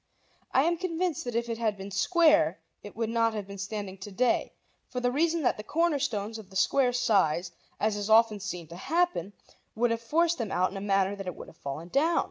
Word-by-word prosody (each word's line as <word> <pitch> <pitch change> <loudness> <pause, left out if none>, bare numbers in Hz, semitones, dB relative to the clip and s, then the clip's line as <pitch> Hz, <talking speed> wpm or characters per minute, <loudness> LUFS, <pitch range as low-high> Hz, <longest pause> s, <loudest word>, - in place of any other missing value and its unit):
I 265 - +4
am 340 +2 +1
convinced 350 -3 -2
that 245 -2 -4
if 235 0 0
it 230 -1 -4
had 215 -3 0
been 195 +1 -8
square 300 - +4 0.2
it 205 - -11
would 225 0 -2
not 230 -1 +2
have 210 -2 -4
been 200 0 -9
standing 195 -1 -5
to 205 +2 -8
day, 240 +4 +1 0.4
for 250 - -3
the 245 0 +1
reason 325 +3 +1
that - - +2
the 210 - -6
corner 330 +4 +1
stones 220 -4 -2
of 205 -4 -12
the 190 - -15
square 250 +6 +3
sides, 190 -8 +2 0.3
as 215 0 +1
is 205 0 -3
often 220 -1 +5
seen 180 -5 -5
to 170 - -9
happen, 305 - 0 0.4
would 235 +1 +2
have 230 0 -1
forced 330 +7 +1
them 225 -4 -3
out 185 +1 +1
in 195 - -6
a - - -5
manner 195 0 +1
that 195 -2 -7
it 180 - -4
would - - -10
have 165 - -18
fallen 155 +4 -6
down. 320 - +2
220 Hz, 235 wpm, -28 LUFS, 195-270 Hz, 0.4 s, often